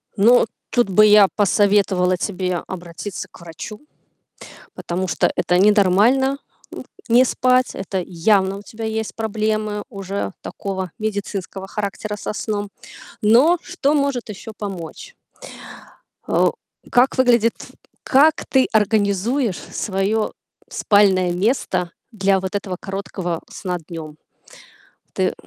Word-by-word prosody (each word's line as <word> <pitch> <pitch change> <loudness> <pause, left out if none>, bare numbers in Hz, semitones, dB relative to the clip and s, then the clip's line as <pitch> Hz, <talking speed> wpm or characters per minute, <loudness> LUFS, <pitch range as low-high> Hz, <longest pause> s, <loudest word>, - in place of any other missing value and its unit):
Ну, 235 +4 +5 0.3
тут 240 -5 +2
бы 215 +3 +6
я 210 -1 +7
посоветовала 200 -3 +3
тебе 185 -2 -2
обратиться 175 +2 -7
к - - -16
врачу, 170 - -9 0.9
потому 185 +2 -3
что - - +1
это 180 - +1
ненормально, 210 +7 +4 0.4
м, - - -7 0.3
не 245 +2 +6
спать. 255 0 +2
Это 190 -1 -3
явно 190 +2 +1
у - - -9
тебя 220 +2 -8
есть 220 -2 -3
проблемы 215 -1 -2
уже 195 -2 -4
такого 190 -3 -5
медицинского 200 -2 -4
характера 210 +1 -4
со - - -4
сном. 205 -1 -3 0.5
Но, 250 +12 +5
что 295 -6 -1
может 280 -6 0
ещё 210 +2 -8
помочь. 195 - -7 1.1
А - - +2
о - - 0 0.4
как 250 +3 +3
выглядит 240 -3 +4 0.5
как 295 +4 +4
ты 265 -1 +3
организуешь 215 +2 +1
своё 205 +2 -2 0.4
спальное 190 -4 +3
место 185 -3 0 0.2
для 195 -3 +2
вот 190 +1 -5
этого 195 -2 -3
короткого, 190 -3 -4
сна 180 -3 -4
днём? 155 -3 -8 1.0
Ты, - - -1
м - - -2
205 Hz, 120 wpm, -20 LUFS, 190-225 Hz, 1.1 s, я